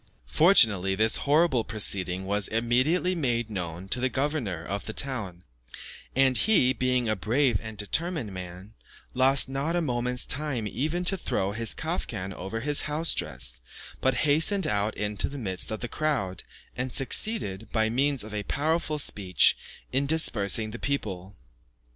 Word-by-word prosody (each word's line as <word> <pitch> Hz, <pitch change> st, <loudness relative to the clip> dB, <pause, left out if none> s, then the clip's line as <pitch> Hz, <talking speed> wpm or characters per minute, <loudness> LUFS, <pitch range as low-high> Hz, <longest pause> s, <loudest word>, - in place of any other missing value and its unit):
Fortunately, 100 Hz, -, +4 dB
this 110 Hz, +2 st, +4 dB
horrible 145 Hz, -5 st, +3 dB
proceeding 95 Hz, -4 st, 0 dB
was 100 Hz, 0 st, +2 dB
immediately 130 Hz, +11 st, +1 dB
made 120 Hz, -9 st, -1 dB
known 90 Hz, -2 st, -5 dB
to 125 Hz, -, +1 dB
the 130 Hz, +1 st, 0 dB
governor 130 Hz, -, -3 dB
of 100 Hz, +1 st, -5 dB
the 110 Hz, -, -5 dB
town; 105 Hz, -11 st, -2 dB, 0.7 s
and 130 Hz, 0 st, +3 dB
he, 130 Hz, -13 st, +4 dB
being 125 Hz, -2 st, 0 dB
a 110 Hz, -, 0 dB
brave 120 Hz, +2 st, +1 dB
and 110 Hz, -1 st, -8 dB
determined 150 Hz, -, -2 dB
man, 90 Hz, +2 st, -9 dB, 0.4 s
lost 135 Hz, +2 st, +3 dB
not 140 Hz, +5 st, -2 dB
a -, -, +2 dB
moment's 125 Hz, -4 st, -1 dB
time 135 Hz, -5 st, -1 dB
even 155 Hz, -, -2 dB
to 195 Hz, -, +5 dB
throw 95 Hz, -, -2 dB
his 115 Hz, +1 st, -1 dB
kaftan 110 Hz, -, -4 dB
over 95 Hz, +5 st, -6 dB
his 145 Hz, +2 st, +3 dB
house 160 Hz, +3 st, +3 dB
dress, -, -, -2 dB, 0.4 s
but 130 Hz, -1 st, +1 dB
hastened 165 Hz, +6 st, +3 dB
out 105 Hz, -3 st, -1 dB
into 105 Hz, -1 st, -1 dB
the 145 Hz, -, -8 dB
midst 95 Hz, -8 st, -1 dB
of 110 Hz, -, -4 dB
the 120 Hz, -, -3 dB
crowd, 125 Hz, -, -2 dB, 0.3 s
and 125 Hz, +1 st, -3 dB
succeeded, 125 Hz, -, 0 dB
by 110 Hz, -1 st, +1 dB
means 135 Hz, +3 st, +1 dB
of 105 Hz, 0 st, -10 dB
a 105 Hz, -, -2 dB
powerful 155 Hz, -, -1 dB
speech, 95 Hz, -, +3 dB, 0.4 s
in 140 Hz, +2 st, +1 dB
dispersing 110 Hz, -, +2 dB
the 120 Hz, -, -7 dB
people. 100 Hz, -9 st, -4 dB
120 Hz, 155 wpm, -26 LUFS, 100-145 Hz, 0.7 s, to